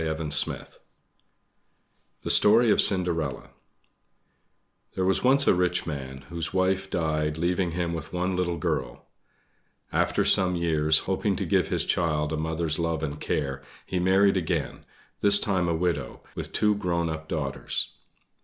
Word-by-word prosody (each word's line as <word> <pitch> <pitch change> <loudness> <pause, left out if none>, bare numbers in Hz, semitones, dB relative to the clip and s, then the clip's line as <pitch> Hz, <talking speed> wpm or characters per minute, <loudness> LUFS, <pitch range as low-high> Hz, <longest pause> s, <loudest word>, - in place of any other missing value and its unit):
THE 80 -3 -4 1.5
STORY 110 +2 +5
OF - - +5
CINDERELLA 85 -7 +2 1.4
There 95 - 0
was 95 0 +1
once 135 +2 +4
a - - +5
rich 90 -1 0
man, 65 -4 -6
whose 85 -1 -2
wife 95 +1 0
died, 75 -3 -1
leaving 85 +1 0
him 85 -1 -2
with 80 -2 -6
one 90 +1 -1
little 90 -1 -1
girl. 60 -5 -3 0.9
After - - +1
some 90 -1 +4
years, 80 -2 +2
hoping - - 0
to - - -3
give - - +1
his - - -1
child 75 -3 0
a - - -2
mother's 80 0 -1
love 85 -2 -1
and 75 -1 -5
care, 70 -3 -2 0.2
he 90 - -2
married 95 +2 +3
again, 85 -4 -3 0.3
this 100 0 +5
time 95 -4 0
a 85 - 0
widow, 85 +1 -2
with - - -6
two 105 0 +2
grown 85 -4 -1
up 80 0 -5
daughters. 70 -4 -3
85 Hz, 145 wpm, -26 LUFS, 80-95 Hz, 1.5 s, STORY